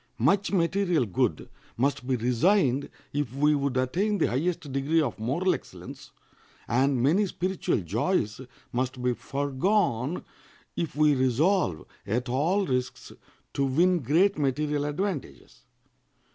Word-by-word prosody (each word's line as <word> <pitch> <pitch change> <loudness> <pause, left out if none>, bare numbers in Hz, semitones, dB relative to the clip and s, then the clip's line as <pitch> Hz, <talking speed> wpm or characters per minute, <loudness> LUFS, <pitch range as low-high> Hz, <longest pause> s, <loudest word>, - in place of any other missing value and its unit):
Much 195 - +2
material 175 -4 +1
good 95 -5 -1 0.3
must 130 0 0
be 130 - +1
resigned 130 - +2 0.2
if 145 -4 -1
we 150 +2 +3
would 140 -2 -1
attain 185 +12 0
the - - +2
highest 150 +1 -2
degree 140 +4 +1
of 120 - -1
moral 150 +12 +1
excellence, 140 - -9 0.6
and 130 +1 +2
many 185 +9 +3
spiritual 185 -7 -1
joys 110 - -1 0.3
must 130 +1 -2
be 125 0 +2
foregone 140 - -1 0.5
if 165 -4 -3
we 150 0 +4
resolve 130 - +1 0.2
at 120 +5 -1
all 165 +11 +1
risks 125 -5 -3 0.4
to 140 - 0
win 170 +7 +3
great 165 - +2
material 145 +1 0
advantages. 145 - -5
145 Hz, 125 wpm, -27 LUFS, 125-175 Hz, 0.6 s, we